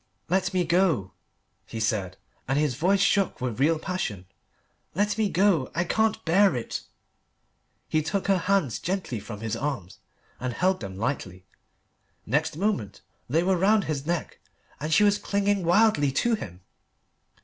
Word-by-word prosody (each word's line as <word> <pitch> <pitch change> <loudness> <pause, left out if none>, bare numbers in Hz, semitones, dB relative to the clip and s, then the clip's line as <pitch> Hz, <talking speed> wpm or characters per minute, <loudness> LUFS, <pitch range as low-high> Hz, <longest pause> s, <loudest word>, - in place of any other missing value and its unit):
"Let 185 +1 +1
me 180 -2 +1
go," 165 - +2 0.6
he 115 - -6
said, 100 -4 -1 0.3
and 135 +2 +1
his 150 -3 +1
voice 185 +9 +2
shook 200 -1 +2
with 125 -2 -3
real 160 +4 +3
passion, 155 - -4 0.7
"let 205 +1 +1
me 215 -2 +1
go 180 -8 +2
I 175 - +2
can't 220 +4 0
bear 190 +2 +4
it." 120 - -4 1.1
He 155 - +1
took 190 +6 -2
her 195 -2 +3
hands 185 - +1
gently 180 - -3
from 105 0 -8
his 115 0 -2
arms 115 -10 -4 0.4
and 125 -1 -3
held 185 +6 +1
them 95 -3 -7
lightly. 95 -6 -3 0.8
Next - - 0
moment 195 - -1 0.3
they 160 +6 +2
were 185 0 +2
round 205 +2 +4
his 150 -3 -3
neck, 175 -1 -2 0.4
and 155 +3 -3
she 210 - +5
was 205 0 +4
clinging 200 -1 0
wildly 175 -5 +4
to 235 - +1
him. 90 - -5
165 Hz, 155 wpm, -26 LUFS, 120-195 Hz, 1.1 s, she